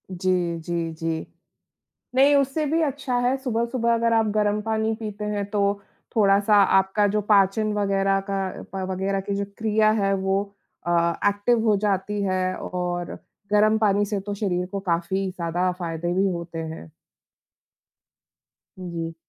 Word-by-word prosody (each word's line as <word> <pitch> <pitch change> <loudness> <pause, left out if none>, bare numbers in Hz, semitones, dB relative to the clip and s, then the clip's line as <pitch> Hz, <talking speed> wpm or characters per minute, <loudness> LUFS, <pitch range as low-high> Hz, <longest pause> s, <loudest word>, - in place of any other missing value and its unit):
जी, 180 -2 0
जी, 165 0 -3
जी। 160 0 -3 0.9
नहीं 280 +2 +5
उससे 280 +2 +1
भी 320 +3 +1
अच्छा 280 -4 -1
है 245 +2 +2
सुबह-सुबह 235 -2 0
अगर 230 0 +2
आप 225 -1 +3
गरम 210 0 +1
पानी 220 0 0
पीते 210 -1 -5
हैं 205 -1 -2
तो 205 -1 0 0.5
थोड़ा-सा 205 0 +4 0.2
आपका 190 +2 +2
जो 210 +1 0
पाचन 210 +1 +3
वग़ैरह 195 -1 +1
का 195 - -1 0.4
प 190 -1 -3
वग़ैरह 195 +1 -1
की 200 +1 -3
जो 200 0 -1
क्रिया 215 -1 +3
है 195 0 +2
वो 195 0 +1 0.5
अ, 170 0 +2
एक्टिव 205 +4 +2
हो 210 - +5
जाती 205 0 -1
है 185 -1 0
और 175 -1 -4 0.4
गरम 215 +1 +4
पानी 205 -1 +2
से 205 0 -2
तो 205 +1 -5
शरीर 180 -3 -1
को 200 - -2
काफ़ी 190 +1 -1
ज़्यादा 180 0 -1
फ़ायदे 170 0 -3
भी 190 +2 +2
होते 170 -1 -5
हैं। 160 0 -7 1.9
जी। 170 -3 -5
200 Hz, 150 wpm, -24 LUFS, 180-215 Hz, 1.9 s, नहीं